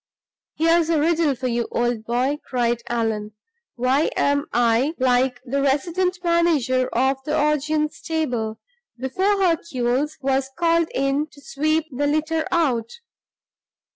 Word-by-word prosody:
"Here's 330 Hz, +1 st, +3 dB
a 325 Hz, -2 st, +2 dB
riddle 320 Hz, -2 st, +2 dB
for 255 Hz, +1 st, -6 dB
you, 240 Hz, -1 st, 0 dB
old 240 Hz, -2 st, -1 dB
boy!" 255 Hz, +5 st, 0 dB
cried 240 Hz, -2 st, -1 dB
Allan. 220 Hz, -3 st, -2 dB, 0.4 s
"Why 255 Hz, +5 st, +2 dB
am 285 Hz, +1 st, +1 dB
I 240 Hz, +6 st, +2 dB
like 255 Hz, 0 st, +2 dB
the 275 Hz, +2 st, -1 dB
resident 340 Hz, +7 st, 0 dB
manager 310 Hz, -7 st, +2 dB
of 265 Hz, +2 st, 0 dB
the 300 Hz, +2 st, -1 dB
Augean 300 Hz, +1 st, +1 dB
stable, 245 Hz, -9 st, -3 dB, 0.4 s
before 375 Hz, +12 st, 0 dB
Hercules 300 Hz, -6 st, 0 dB
was 270 Hz, 0 st, 0 dB
called 335 Hz, -1 st, +2 dB
in 275 Hz, +3 st, 0 dB
to 295 Hz, -, -18 dB
sweep 310 Hz, +3 st, 0 dB
the 285 Hz, +3 st, -1 dB
litter 315 Hz, +2 st, 0 dB
out? 255 Hz, -10 st, +1 dB
275 Hz, 130 wpm, -22 LUFS, 245-315 Hz, 0.4 s, Here's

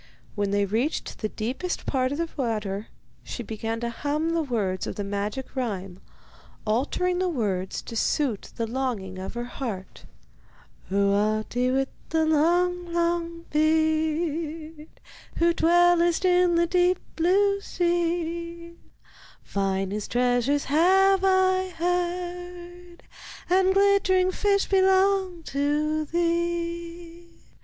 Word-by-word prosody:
When 205 Hz, -2 st, -1 dB
they 200 Hz, 0 st, +1 dB
reached 230 Hz, +10 st, -2 dB
the 215 Hz, -, -2 dB
deepest 255 Hz, +13 st, -4 dB
part 255 Hz, -1 st, 0 dB
of 285 Hz, -, -2 dB
the 335 Hz, 0 st, -1 dB
water, 215 Hz, -6 st, -2 dB, 0.4 s
she 240 Hz, -, -6 dB
began 225 Hz, +1 st, -4 dB
to 235 Hz, 0 st, -2 dB
hum 300 Hz, +6 st, -1 dB
the 335 Hz, 0 st, +1 dB
words 210 Hz, -10 st, -2 dB
of -, -, -5 dB
the 205 Hz, -, -3 dB
magic 205 Hz, +7 st, -4 dB
rhyme, 195 Hz, -7 st, -3 dB, 0.7 s
altering 295 Hz, +11 st, 0 dB
the 370 Hz, 0 st, +1 dB
words 200 Hz, -, -2 dB
to 230 Hz, -, -8 dB
suit 235 Hz, -2 st, 0 dB
the 230 Hz, -, -2 dB
longing 225 Hz, -6 st, -3 dB
of 190 Hz, +4 st, -6 dB
her 240 Hz, -, -3 dB
heart: 230 Hz, -7 st, -6 dB, 0.8 s
Oh, 200 Hz, +1 st, +2 dB
Ahti, 215 Hz, +4 st, 0 dB
with 270 Hz, +1 st, +1 dB, 0.2 s
the 320 Hz, 0 st, +2 dB
long, 350 Hz, +3 st, +2 dB
long 335 Hz, 0 st, -1 dB
beard, 315 Hz, 0 st, 0 dB, 0.5 s
Who 340 Hz, 0 st, +3 dB
dwellest 345 Hz, +1 st, +3 dB
in 360 Hz, -1 st, +4 dB
the 340 Hz, 0 st, +3 dB
deep 360 Hz, +1 st, +2 dB, 0.2 s
blue 400 Hz, +4 st, +2 dB
sea, 340 Hz, -1 st, -2 dB, 0.7 s
Finest 195 Hz, +1 st, -2 dB
treasures 245 Hz, +3 st, +2 dB
have 380 Hz, +5 st, +4 dB
I 375 Hz, 0 st, +3 dB
heard, 355 Hz, 0 st, -4 dB, 0.5 s
And 375 Hz, +1 st, +4 dB
glittering 385 Hz, -2 st, +3 dB
fish 400 Hz, +1 st, +1 dB
belong 380 Hz, -2 st, +2 dB
to 300 Hz, +2 st, 0 dB
thee. 340 Hz, 0 st, -3 dB
325 Hz, 115 wpm, -25 LUFS, 240-350 Hz, 0.8 s, in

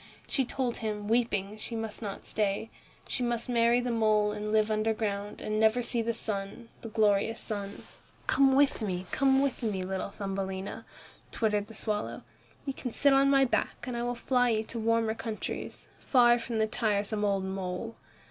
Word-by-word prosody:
She 270 Hz, -, 0 dB
told 250 Hz, -1 st, -2 dB
him, 210 Hz, -2 st, -3 dB
weeping, 215 Hz, -3 st, 0 dB
she 230 Hz, -, -6 dB
must 225 Hz, -1 st, -4 dB
not 200 Hz, -3 st, -6 dB
stay. 210 Hz, +1 st, -1 dB, 0.4 s
She -, -, -3 dB
must 240 Hz, -1 st, 0 dB
marry 235 Hz, 0 st, +4 dB
the 245 Hz, 0 st, -1 dB
mole 215 Hz, -2 st, +3 dB
and 210 Hz, 0 st, -4 dB
live 215 Hz, 0 st, +3 dB
underground, 215 Hz, -2 st, -1 dB
and 215 Hz, 0 st, -2 dB
never 220 Hz, +3 st, +4 dB
see 235 Hz, 0 st, 0 dB
the 230 Hz, +1 st, 0 dB
sun, 205 Hz, +1 st, -5 dB
the 225 Hz, -, -6 dB
glorious 215 Hz, 0 st, +2 dB
sun. 200 Hz, -2 st, -5 dB, 0.4 s
"Come 270 Hz, -1 st, +4 dB
with 280 Hz, -3 st, +3 dB
me, 185 Hz, -3 st, -2 dB
come 270 Hz, 0 st, +4 dB
with 275 Hz, -2 st, -1 dB
me, 205 Hz, -5 st, -1 dB
little 190 Hz, +1 st, -3 dB
Thumbelina," 195 Hz, -1 st, -4 dB, 0.5 s
twittered 210 Hz, -2 st, 0 dB
the 225 Hz, -, -11 dB
swallow. 210 Hz, -, -2 dB, 0.4 s
"You 275 Hz, -, -2 dB
can 255 Hz, -, -5 dB
sit 280 Hz, +4 st, +3 dB
on 275 Hz, 0 st, +5 dB
my 275 Hz, -1 st, +5 dB
back, 250 Hz, -, -1 dB
and 250 Hz, -2 st, -4 dB
I 235 Hz, -, -2 dB
will 245 Hz, 0 st, -1 dB
fly 245 Hz, +1 st, +2 dB
with 225 Hz, -, +2 dB
you 215 Hz, -, -1 dB
to 230 Hz, -, -5 dB
warmer 225 Hz, 0 st, +2 dB
countries, 225 Hz, -1 st, -5 dB
far 240 Hz, -2 st, +5 dB
from 230 Hz, 0 st, -3 dB
the 220 Hz, -, +3 dB
tiresome 215 Hz, -2 st, 0 dB
old 200 Hz, -2 st, +1 dB
mole. 190 Hz, +3 st, -4 dB
220 Hz, 185 wpm, -30 LUFS, 205-240 Hz, 0.5 s, on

